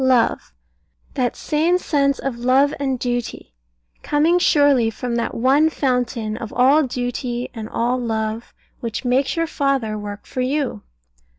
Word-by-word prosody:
Love; 255 -3 +2 0.6
that 250 -4 -1
same 325 +4 +1
sense 280 -5 +1
of 255 -3 -4
love 260 +4 +3
and 265 -2 -1
duty, 245 - -4 0.5
coming 315 +4 +2
surely 285 -8 +4
from 235 +2 -4
that 235 - -2
one 275 +6 +3
Fountain 245 -6 -1
of 225 -2 -7
all 270 +5 +5
duty 245 -2 -3
and 220 -2 -7
all 245 +2 0
love, 220 -1 -3 0.3
which 230 +2 -5
makes 260 +2 +1
your 330 0 +1
father 275 -9 -1
work 205 0 -7
for 255 - -4
you. 265 - -1
250 Hz, 140 wpm, -21 LUFS, 235-280 Hz, 0.6 s, all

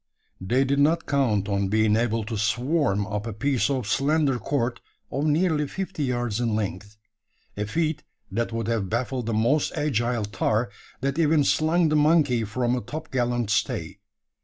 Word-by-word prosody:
They 125 +8 +2
did 140 +1 +1
not 160 +3 +3
count 115 -8 +1
on 100 -1 0
being 110 +1 +3
able 115 -1 0
to 110 +2 -5
"swarm" 115 - +1
up 105 +2 -4
a 115 - -4
piece 135 +5 0
of 130 -4 -1
slender 140 +2 +1
cord 120 -3 -2 0.3
of 140 +3 -1
nearly 155 -1 +2
fifty 190 -3 -4
yards 120 -3 -1
in 115 -3 0
length 100 0 -4 0.6
a 105 - -2
feat 155 +4 -1 0.3
that 115 +4 -1
would 115 -1 -3
have 110 -5 -1
baffled 120 +1 -2
the 115 - -1
most 120 +7 +2
agile 120 -5 0
tar 110 +2 -1 0.3
that 140 +4 -1
ever 155 -2 +4
"slung 160 +3 +2
the 155 - +1
monkey" 150 -6 +3
from 120 +3 0
a 125 - -2
topgallant 120 -5 -2
stay. 95 -2 -1
120 Hz, 165 wpm, -25 LUFS, 110-145 Hz, 0.6 s, ever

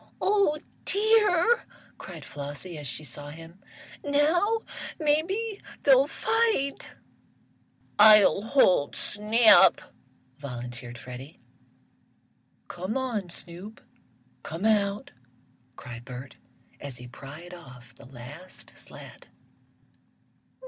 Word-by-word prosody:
"Oh 395 -7 +2 0.3
dear!" 425 +1 +3 0.3
cried 165 -6 -9
Flossie 145 +5 -7
as 145 - -6
she 155 - -3
saw 145 +2 -7
him, 165 +4 -12 0.4
"now 335 +10 +2 0.4
maybe 380 +9 0 0.2
they'll 270 0 +6
fight!" 445 -8 0 1.0
"I'll 210 -2 +7
hold 205 - +3
Snap," 215 +2 +5 0.6
volunteered 120 -2 -7
Freddie. 130 +4 -10 1.3
"Come 185 +7 -4
on, 230 -8 -3
Snoop! 180 +6 -8 0.6
Come 165 +6 -5
out!" 205 -2 +1 0.6
cried 120 -1 -9
Bert, 125 +1 -9 0.4
as 140 -3 -7
he 125 - -10
pried 145 +7 -11
off 125 -8 -13
the 130 - -16
last 140 +8 -12
slat. - - -12
185 Hz, 90 wpm, -27 LUFS, -, 1.3 s, I'll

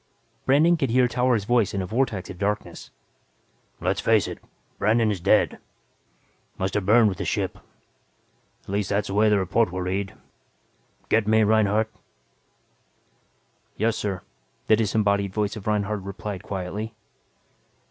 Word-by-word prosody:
Brandon 155 +6 +5
could 135 -5 0
hear 125 +2 +4
Towers' 125 -3 +1
voice 115 -2 +1
in 100 - 0
a - - -3
vortex 110 -1 -1
of 90 - -11
darkness. 105 +1 -3 0.9
"Let's 95 +3 -1
face 110 -4 +3
it - - -7 0.4
Brandon 110 +1 +3
is 100 - -3
dead. 100 +5 +2 1.0
Must 95 +1 -2
have 100 -2 -1
burned 110 +1 +6
with 95 -4 -2
the - - -1
ship, - - -2 1.0
at - - -16
least 100 0 -1
that's 100 0 0
the - - -3
way 105 +2 +4
the 105 - +4
report 100 +2 +1
will 90 0 -3
read. 95 +2 -3 0.9
Get 110 -1 +2
me, 110 0 +4
Reinhardt?" 110 +1 +2 1.9
"Yes, 110 +1 +1
sir," 95 -4 -3 0.4
the 110 - +5
disembodied 100 -2 0
voice 105 -1 -1
of 110 -2 -8
Reinhardt 105 -1 0
replied 100 0 -6
quietly. 105 +2 -5
105 Hz, 145 wpm, -24 LUFS, 100-110 Hz, 1.9 s, burned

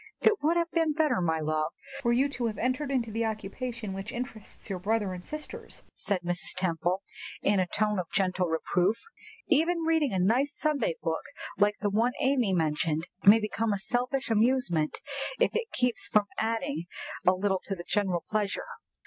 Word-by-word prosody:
"It 430 - +3
would 325 +3 +3
have 335 0 0
been 325 -2 +2
better, 305 - +2
my 160 -2 +1
love, 155 +1 -1 0.3
for 235 -3 +2
you 255 +4 +4
to 245 -4 -2
have 215 -2 -4
entered 255 +5 0
into 245 -5 0
the 225 +2 -1
occupation 220 0 -4
which 195 +4 -5
interests 240 -3 -7
your 190 -3 -3
brothers 205 +1 0
and 180 -1 -7
sisters," 305 +6 -8
said 200 -3 -1
Mrs. 175 0 -3
Temple, 180 +1 0 0.4
in 200 -1 +3
a 185 - +2
tone 210 +1 +1
of 175 - -3
gentle 185 -2 +1
reproof. 180 +5 +1 0.5
"Even 335 +2 +3
reading 320 -4 +2
a 190 - 0
nice 245 +10 +2
Sunday 310 - +1
book - - 0 0.4
like 205 +1 +4
the 205 -1 +1
one 230 +4 +2
Amy 260 -6 +2
mentioned 160 -1 +1 0.2
may 210 +3 +9
become 215 0 -1
a - - 0
selfish 245 +5 -1
amusement, 220 -9 +2 0.4
if - - +4
it 460 0 -1
keeps 250 -1 0
us - - -25
from 210 -1 +5
adding 225 - -1 0.4
a 185 - +7
little 190 0 0
to 195 - -2
the 175 -1 -8
general 190 -5 +1
pleasure." 210 -2 -1
215 Hz, 185 wpm, -29 LUFS, 185-255 Hz, 0.5 s, may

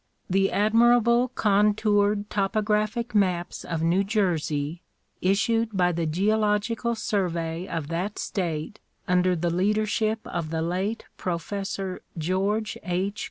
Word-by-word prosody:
The 195 +1 +2
admirable 235 +3 +4
contoured 205 -2 +2
topographic 215 +3 0
maps 185 -4 0
of 165 -2 -3
New 175 +4 +3
Jersey, 170 -6 -1 0.4
issued 220 +3 +1
by 180 -1 +3
the 165 -1 -1
Geological 215 +6 +1
Survey 170 -5 -2
of 165 -4 -4
that 180 +5 -3
state 170 0 -3 0.3
under 180 0 +3
the 170 0 -1
leadership 215 +4 +1
of 165 -2 -4
the 160 0 -1
late 190 +6 -2
Professor 190 +1 -3 0.2
George 195 +6 -1
H. 190 +3 -2
195 Hz, 115 wpm, -26 LUFS, 175-215 Hz, 0.4 s, admirable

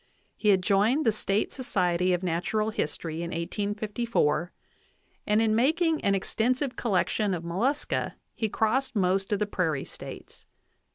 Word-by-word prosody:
He 210 - +1
had 190 -2 +4
joined 215 +11 +3
the 225 - +5
State 210 -1 0
Society 180 -8 +1
of 180 +1 0
Natural 185 +5 0
History 165 -6 -3
in 170 0 -3
1854, 205 -1 -1 0.8
and 210 0 +3
in 220 -1 +2
making 315 +7 +2
an 200 - +3
extensive 250 +7 0
collection 205 -2 0
of 170 - -6
mollusca 235 +13 -1 0.2
he 220 - -2
crossed 245 +5 0
most 190 0 +1
of 205 - +2
the 210 - 0
prairie 165 -8 -1
States. - - -10
205 Hz, 145 wpm, -27 LUFS, 180-230 Hz, 0.8 s, the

